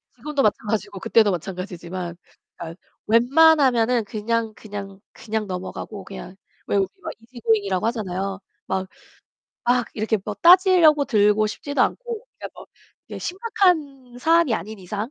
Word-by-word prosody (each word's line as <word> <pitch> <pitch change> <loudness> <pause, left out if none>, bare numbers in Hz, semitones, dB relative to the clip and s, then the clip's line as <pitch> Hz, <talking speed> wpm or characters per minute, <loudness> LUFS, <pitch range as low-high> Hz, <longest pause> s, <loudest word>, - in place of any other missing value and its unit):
지금도 300 -2 -2
마찬가지고 205 -1 -1
그때도 215 +1 +3
마찬가지지만 180 -1 -5 0.4
그니까 165 -1 -7 0.3
웬만하면은 250 -2 +4
그냥, 220 +1 -2
그냥, 200 -2 -8
그냥 220 -1 -4
넘어가고 190 +2 -6 0.6
왜 - - +1
우리 195 -1 +2
막 - - -5
이지고잉이라고 225 -5 -1
하잖아요. 195 -4 -3 0.3
막, 190 0 -2 0.8
막 245 -1 +2
이렇게 220 0 0
뭐 210 - -4
따지려고 345 - +6
들고 210 -3 +3
싶지도 285 +7 -4
않고 475 -2 -3
그니까 - - -6 0.6
뭐 - - -7
심각한 330 - -1
사안이 325 -4 +3
아닌 215 +4 -6
이상. 205 +6 -5
220 Hz, 320 characters per minute, -22 LUFS, 200-275 Hz, 0.8 s, 따지려고